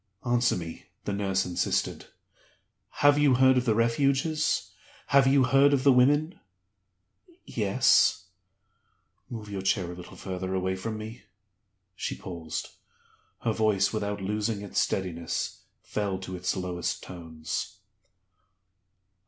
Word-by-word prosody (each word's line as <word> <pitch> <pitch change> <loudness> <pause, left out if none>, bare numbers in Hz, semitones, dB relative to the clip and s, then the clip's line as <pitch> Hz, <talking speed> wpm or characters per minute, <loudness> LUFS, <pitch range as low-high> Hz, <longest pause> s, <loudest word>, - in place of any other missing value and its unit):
"Answer 120 0 +2
me," 85 -2 -7 0.2
the 100 - -2
nurse 95 -1 0
insisted. 90 0 -1 1.0
"Have 145 0 +7
you 145 -3 +5
heard 130 +1 +5
of 125 -1 +1
the 110 -3 +2
Refuges? 135 +7 +1 0.4
Have 135 -1 +5
you 135 0 +5
heard 135 +2 +5
of 135 -2 +2
the 140 - +7
Women?" 145 +7 +3 1.1
"Yes." 100 -4 +3 1.0
"Move 110 -3 -7
your 100 -2 -4
chair 95 -2 0
a - - -8
little 90 0 -11
further 95 0 -4
away 95 0 0
from 110 +3 -4
me." 110 +2 -9 0.7
She - - -3
paused. 85 -4 -6 0.7
Her 115 - 0
voice, 105 -3 +2
without 105 -2 -2
losing 105 +1 -1
its 100 - -1
steadiness, 85 -3 -2 0.2
fell 100 -3 -2
to 95 0 -7
its 90 +1 -2
lowest 90 -1 -3
tones. 80 -3 -6
105 Hz, 125 wpm, -28 LUFS, 95-125 Hz, 1.1 s, Have